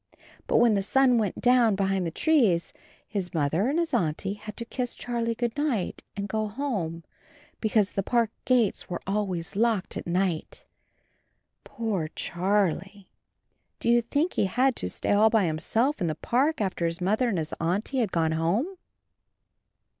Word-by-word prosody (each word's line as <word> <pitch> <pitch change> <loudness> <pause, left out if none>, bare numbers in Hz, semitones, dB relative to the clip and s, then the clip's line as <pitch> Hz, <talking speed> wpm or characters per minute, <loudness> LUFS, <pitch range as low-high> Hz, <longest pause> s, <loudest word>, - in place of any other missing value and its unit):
But - - +3
when 235 -2 +5
the 200 - +2
sun 250 +3 +3
went 205 -4 -2
down 245 -4 +4
behind 195 -2 0
the - - -1
trees 215 - +2 0.3
his 190 -5 -4
Mother 160 - +1
and 295 - 0
his 335 -1 -1
Auntie 170 +4 0
had 210 0 -9
to 235 - -5
kiss 245 0 -4
Charlie 235 -1 -2
"Good 235 0 -2
night," 285 -10 -1 0.2
and 200 0 -2
go 215 +1 -1
home, 205 - -3 0.6
be 220 - -1
cause 210 -2 +2
the 195 - -1
park 230 +2 +1
gates 245 -5 +1
were 175 - -4
always 195 -3 -2
locked 220 -3 0
at - - -6
night. 175 -2 -1 1.0
Poor 210 -9 -2
Charlie! 195 +1 -1 0.7
Do - - -1
you 240 0 +5
think 290 +9 0
he - - +1
had 250 +6 +2
to 90 - -2
stay - - -2
all 210 +2 +5
by 220 -3 +3
himself 220 - 0
in 175 - +1
the 155 - -1
park 265 - +1
after 185 -4 0
his 165 0 -4
Mother 215 +7 +1
and 200 - -1
his 155 -1 -3
Auntie 195 +11 -1
had 220 -6 0
gone 160 -2 +1
home? 195 - 0
210 Hz, 170 wpm, -27 LUFS, 180-240 Hz, 1.0 s, when